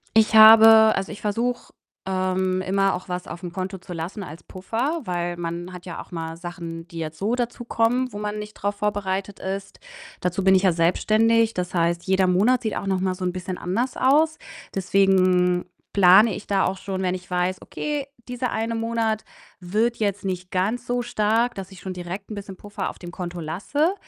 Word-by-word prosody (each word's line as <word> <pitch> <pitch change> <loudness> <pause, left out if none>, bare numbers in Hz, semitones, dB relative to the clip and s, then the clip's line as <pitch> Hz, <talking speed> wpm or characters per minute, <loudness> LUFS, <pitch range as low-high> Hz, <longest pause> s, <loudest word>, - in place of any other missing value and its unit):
Ich 220 0 +4
habe 220 0 +9
also, 195 0 -3
ich 210 - -9
versuche, 235 +4 -2 0.3
ähm, 185 0 0
immer 195 +1 +1
auch 180 - -8
was 180 0 -4
aufm 175 0 -7
Konto 190 +1 -4
zu 180 0 -9
lassen 175 +5 -5
als 165 -1 -10
Puffer, 240 - -3
weil 175 -1 -2
man 175 +1 -5
hat 180 -1 -10
ja 175 - -6
auch - - -15
mal 165 -1 -5
Sachen, 170 -1 -7
die 170 - -10
jetzt 160 -1 -5
so 215 +5 0
dazukommen, 240 +1 0
wo - - -7
man 210 0 -3
nicht 210 0 -7
drauf 205 +1 -2
vorbereitet 200 -1 -2
ist. 195 +1 -5 0.4
Dazu 180 +2 -1
bin 190 0 +5
ich 185 - +3
ja 185 -3 +4
selbstständig, 220 +7 +3
das 180 0 -3
heißt, 170 -1 +1
jeder 190 -1 +2
Monat 215 +8 +3
sieht 220 - -2
auch - - -4
noch 190 -1 +1
mal 185 0 -1
so 185 - -7
'n 180 - 0
bisschen 185 0 -5
anders 230 +9 -2
aus. 305 +4 +3 0.4
Deswegen 185 -2 +3 0.3
plane 200 +3 +6
ich - - -9
da 195 -1 +2
auch 190 +1 -1
schon, 190 0 -4
wenn 180 0 0
ich 180 -1 -10
weiß: 180 +1 -1
„Okay, 295 -2 -4 0.2
dieser 250 0 -3
eine 225 +1 -2
Monat 225 -1 -1 0.4
wird 215 +7 0
jetzt 205 -2 -1
nicht 180 -1 -3
ganz 210 +7 -1
so 245 0 0
stark,“ 230 0 +1
dass 195 0 -7
ich 190 - -12
schon 185 0 -5
direkt 180 +4 -7
'n - - -4
bisschen 200 -1 -8
Puffer 205 -2 -5
auf - - -10
dem 175 -1 -8
Konto 175 -1 -6
lasse. 210 - 0
195 Hz, 200 wpm, -23 LUFS, 180-220 Hz, 0.4 s, habe